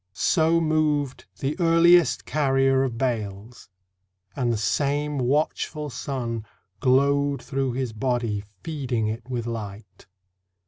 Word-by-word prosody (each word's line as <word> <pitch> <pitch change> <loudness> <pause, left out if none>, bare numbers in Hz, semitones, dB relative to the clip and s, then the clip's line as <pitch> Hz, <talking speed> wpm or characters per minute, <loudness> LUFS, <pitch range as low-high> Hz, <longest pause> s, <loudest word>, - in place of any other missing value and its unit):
So 165 0 +3
moved 155 -4 0 0.2
the 140 +2 -1
earliest 170 0 +5
carrier 135 -2 +2
of 130 -4 -1
bales, 110 -3 -4 0.7
And 125 -3 0
the 115 - 0
same 145 +6 0
watchful 150 +3 -1
sun 120 -5 -4 0.4
Glowed 140 +2 +2
through 135 -1 -2
his 125 -2 -3
body 115 -3 -1 0.2
feeding 130 -8 -2
it 115 +3 -6
with 120 -3 -3
light. 105 -3 -7
135 Hz, 110 wpm, -25 LUFS, 115-145 Hz, 0.7 s, earliest